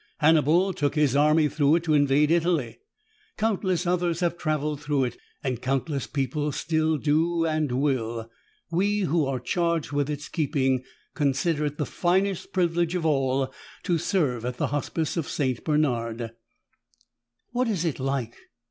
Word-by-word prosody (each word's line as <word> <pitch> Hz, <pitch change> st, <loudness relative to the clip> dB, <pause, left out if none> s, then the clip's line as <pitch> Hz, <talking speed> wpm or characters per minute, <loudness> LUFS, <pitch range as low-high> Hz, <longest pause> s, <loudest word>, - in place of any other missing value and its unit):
Hannibal 160 Hz, +4 st, +4 dB
took 145 Hz, -2 st, -1 dB
his 150 Hz, -3 st, +2 dB
army 150 Hz, +2 st, +4 dB
through 150 Hz, 0 st, +3 dB
it 170 Hz, -, 0 dB
to 160 Hz, -3 st, +1 dB
invade 145 Hz, +1 st, +3 dB
Italy. 170 Hz, -5 st, +1 dB, 0.6 s
Countless 195 Hz, -5 st, 0 dB
others 175 Hz, -1 st, 0 dB
have 175 Hz, -1 st, +1 dB
traveled 150 Hz, -3 st, -2 dB
through 145 Hz, -2 st, +1 dB
it, 120 Hz, -2 st, -3 dB, 0.3 s
and 125 Hz, -3 st, -2 dB
countless 135 Hz, +2 st, -1 dB
people 145 Hz, +2 st, -1 dB
still 155 Hz, +1 st, 0 dB
do 165 Hz, +3 st, +1 dB
and 155 Hz, -3 st, 0 dB
will. 120 Hz, -4 st, -1 dB, 0.4 s
We 205 Hz, +4 st, +1 dB
who 165 Hz, -5 st, +1 dB
are 135 Hz, -2 st, -1 dB
charged 170 Hz, +3 st, -1 dB
with 145 Hz, 0 st, 0 dB
its 150 Hz, 0 st, -4 dB
keeping 135 Hz, -5 st, 0 dB, 0.3 s
consider 150 Hz, +2 st, +1 dB
it 145 Hz, 0 st, -6 dB
the 150 Hz, -, -1 dB
finest 185 Hz, +5 st, 0 dB
privilege 175 Hz, -1 st, +1 dB
of 175 Hz, -3 st, -1 dB
all 135 Hz, -3 st, +1 dB, 0.3 s
to 170 Hz, -2 st, +1 dB
serve 145 Hz, -, 0 dB
at 125 Hz, 0 st, -3 dB
the -, -, -1 dB
Hospice 155 Hz, +3 st, -2 dB
of 165 Hz, -, -2 dB
St. 130 Hz, -4 st, -1 dB
Bernard." 120 Hz, -7 st, 0 dB, 1.2 s
"What 250 Hz, +1 st, 0 dB
is 190 Hz, -6 st, -1 dB
it 160 Hz, -5 st, -1 dB
like?" 130 Hz, -3 st, -2 dB
150 Hz, 155 wpm, -26 LUFS, 135-170 Hz, 1.2 s, Hannibal